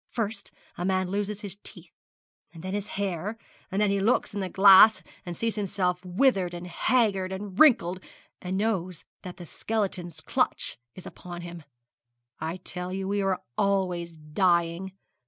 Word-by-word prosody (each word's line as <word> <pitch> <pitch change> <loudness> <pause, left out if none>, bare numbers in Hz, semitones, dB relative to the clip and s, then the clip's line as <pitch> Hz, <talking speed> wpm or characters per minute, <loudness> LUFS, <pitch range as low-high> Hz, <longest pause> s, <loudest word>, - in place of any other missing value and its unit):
First 215 -3 -3 0.3
a - - -2
man 185 0 0
loses 205 +1 -2
his 200 -3 -7
teeth, 175 -4 -12 0.6
and 165 0 -12
then 185 +1 -4
his 205 0 -3
hair, 200 +2 -2 0.3
and 195 +1 -2
then 210 -1 +3
he 200 - +1
looks 215 +2 +1
in 205 - -3
the 190 -2 -2
glass 195 +3 +7 0.2
and 175 - -5
sees 230 -1 -1
himself 185 -3 -1
withered, 185 -2 +1
and 175 +1 -7
haggard, 195 -1 +1
and 190 0 -6
wrinkled, 190 - +5 0.4
and 185 +1 -3
knows 185 -5 -2 0.2
that 180 -2 -9
the 175 - -9
skeleton's 185 -3 -3
clutch - - -1 0.2
is 185 - -11
upon 175 -1 -9
him. 175 -1 -8 0.8
I 160 +3 -3
tell 180 0 -6
you 190 0 -3
we 200 +1 0
are 195 -1 -1 0.2
always 180 -4 0
dying. 170 +3 0
190 Hz, 160 wpm, -27 LUFS, 175-200 Hz, 0.8 s, glass